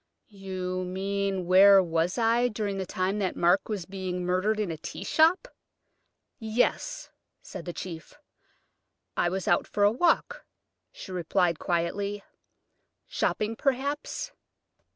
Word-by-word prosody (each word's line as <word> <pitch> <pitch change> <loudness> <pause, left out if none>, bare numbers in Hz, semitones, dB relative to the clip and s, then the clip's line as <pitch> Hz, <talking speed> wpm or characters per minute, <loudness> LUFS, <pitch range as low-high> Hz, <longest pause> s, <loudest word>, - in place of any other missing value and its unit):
"You 185 -2 -4
mean, 195 0 -2
where 195 +2 +7
I - - +7
was 165 +1 0 0.4
during 205 -2 -2
the 190 - -3
time 185 +3 -1
that 190 -3 -1
Mark 175 +5 +2
was 200 -5 -3
being 185 -1 -4
murdered 185 +4 +1
in 205 -5 -1
a 160 - -5
tea - - -7
shop?" 335 +9 +3 0.9
"Yes," 245 - -1 0.3
said 185 -3 -8
the 175 - -4
chief. 165 -3 -8 1.0
"I 175 - +2
was 190 +1 -4
out 175 - +2
for 205 - 0
a 205 - +6
walk," 355 - +1 0.5
she - - -10
replied 175 -1 0
quietly. 200 +4 -2 0.8
"Shopping, 215 +1 -1
perhaps?" 280 - -2
195 Hz, 130 wpm, -27 LUFS, 180-215 Hz, 1.0 s, where